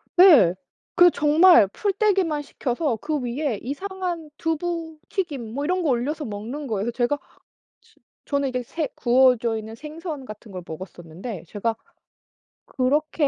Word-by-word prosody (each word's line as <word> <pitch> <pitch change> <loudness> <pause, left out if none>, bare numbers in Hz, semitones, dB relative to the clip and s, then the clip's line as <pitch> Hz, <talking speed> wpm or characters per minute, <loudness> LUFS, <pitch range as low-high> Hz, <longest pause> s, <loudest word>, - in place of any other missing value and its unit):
네. 305 - +8 0.4
그 355 0 +7
정말 310 - +6
풀떼기만 385 - 0
시켜서 275 -1 -2
그 300 +5 -2
위에 250 -2 -2
이상한 350 +3 -4
두부 325 0 -3
튀김 285 - -3
뭐 280 +3 -3
이런 365 +3 0
거 310 - +1
올려서 290 +5 -1
먹는 225 +8 -6
거예요. 215 0 -1
제가 245 +4 0 0.6
즈 - - -27 0.3
저는 280 -1 0
이게 250 -1 -2
새 310 +5 -3
구워져 240 -2 +3
있는 220 0 -7
생선 305 +1 -7
같은 215 -1 -11
걸 185 - -6
먹었었는데 175 +3 -8
제가 225 +5 -2 0.9
"그렇게 290 +3 +1
280 Hz, 275 characters per minute, -24 LUFS, 230-325 Hz, 0.9 s, 네